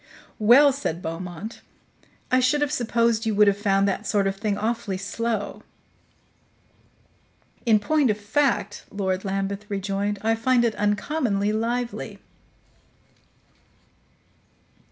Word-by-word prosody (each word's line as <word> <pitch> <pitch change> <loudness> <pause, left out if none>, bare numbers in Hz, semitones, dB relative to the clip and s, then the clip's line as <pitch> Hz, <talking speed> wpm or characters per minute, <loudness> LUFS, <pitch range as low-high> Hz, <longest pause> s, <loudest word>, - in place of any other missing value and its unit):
"Well," 260 +6 +6
said 260 - -3
Beaumont, 175 +5 -6 0.7
"I 255 - +5
should 255 +4 +2
have 295 - +1
supposed 230 -1 +1
you 215 - 0
would 210 +1 +6
have 200 -1 +3
found 200 -1 +2
that 195 - -2
sort 205 -2 +1
of 195 0 0
thing 205 0 -2
awfully 215 -3 -2
slow." 215 +2 -3 2.1
"In 220 -2 +6
point 285 +5 +2
of 210 - +1
fact," 235 +6 0
Lord 190 -2 -2
Lambeth 195 +1 -3
rejoined, 200 +1 -2
"I 225 +1 +3
find 240 +1 +2
it 230 - +1
uncommonly 210 0 0
lively." 235 +2 -2
210 Hz, 115 wpm, -24 LUFS, 200-235 Hz, 2.1 s, Well